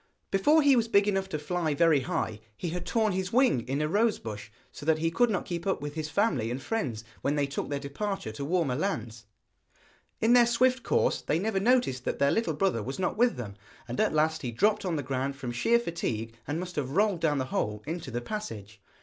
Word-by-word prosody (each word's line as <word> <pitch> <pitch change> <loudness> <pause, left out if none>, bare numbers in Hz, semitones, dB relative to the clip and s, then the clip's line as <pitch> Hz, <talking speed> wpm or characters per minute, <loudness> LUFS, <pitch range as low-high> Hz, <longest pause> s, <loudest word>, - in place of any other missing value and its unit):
Before 295 +11 +4
he 280 -2 +6
was 230 -2 +2
big 200 -2 +4
enough 195 -1 0
to 155 - -2
fly 155 0 -1
very 165 -2 +4
high 135 - -2 0.2
he 175 - -3
had 175 +1 -5
torn 220 -2 +2
his 185 0 -2
wing 250 - +4
in 140 +3 0
a - - +1
rosebush, 155 - -1 0.2
so - - -11
that 160 +1 +3
he 165 +1 0
could 240 +8 +3
not 195 -4 -1
keep 175 +1 -4
up 195 - +1
with 145 0 -5
his 155 -1 -4
family 200 - +1
and 125 +2 -3
friends 130 - -3 0.2
when 145 - 0
they 145 -1 +2
took 140 +1 -4
their 140 -1 -2
departure 150 - -4
to 110 +6 -6
warmer 160 -3 +1
lands. 120 - -3 0.9
In 225 +2 +4
their 240 -1 +7
swift 250 +1 +3
course - - +1
they 155 - 0
never 195 +2 0
noticed 225 - +2
that - - -1
their 140 0 +3
little 225 -9 0
brother 170 - +1
was 130 +6 -5
not 185 -1 -1
with 240 +2 +3
them, 110 -5 -6 0.3
and 120 +1 -5
at - - +3
last 155 +1 +1
he 125 - -3
dropped 205 - +2
on 175 -3 0
the 145 - -2
ground 135 +1 -2
from 130 -3 -5
sheer 175 - +3
fatigue, 115 - -3
and 145 +4 -2
must 180 -1 -6
have 135 -2 -2
rolled 205 -3 +3
down 155 -3 +1
the 130 - -1
hole 105 0 -1
into 160 -1 -5
the 120 0 -3
passage. 110 - -6
160 Hz, 230 wpm, -28 LUFS, 135-205 Hz, 0.9 s, their